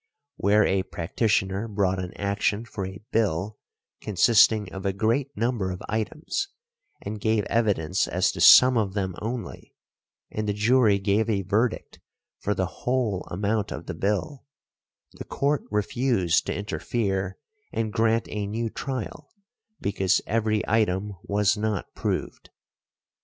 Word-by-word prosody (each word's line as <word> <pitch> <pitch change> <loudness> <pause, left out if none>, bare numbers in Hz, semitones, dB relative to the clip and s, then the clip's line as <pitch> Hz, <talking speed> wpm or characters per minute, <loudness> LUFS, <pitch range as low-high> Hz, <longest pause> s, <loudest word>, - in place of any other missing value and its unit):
Where 105 +1 +4
a 95 0 +2
practitioner 95 +3 -1
brought 100 -3 0
an 90 -1 -4
action 100 +2 -1
for 100 -4 -5
a 95 +2 -10
bill 105 -1 0 0.4
consisting 105 0 +4
of 95 0 -6
a 100 -1 0
great 115 +7 0
number 115 -4 0
of 90 +1 -6
items, 150 - -2 0.6
and 105 0 -5
gave 110 -1 +2
evidence 100 -7 +1
as - - +1
to - - -6
some 125 -1 +8
of 100 -2 -2
them 95 -2 -1
only, 115 +2 -6 0.6
and 110 0 -3
the - - +1
jury 110 0 +4
gave 100 +3 +1
a 100 -3 0
verdict 110 +5 -1 0.4
for 105 - -1
the 95 - 0 0.2
whole 120 -7 -1
amount 105 +3 -1
of - - -6
the - - -5
bill, 125 +8 -2 0.6
the - - -9
Court 145 +1 -1
refused 105 -4 +1
to - - -1
interfere 100 -2 -2 0.3
and 110 -1 -2
grant 115 0 +2
a 105 -1 -3
new 115 +2 -3
trial 135 +2 -5 0.5
because 95 -2 +1
every 110 -1 0
item 105 -2 +1
was 100 0 +1
not 105 -1 -3
proved. - - -3
105 Hz, 140 wpm, -25 LUFS, 95-115 Hz, 0.6 s, some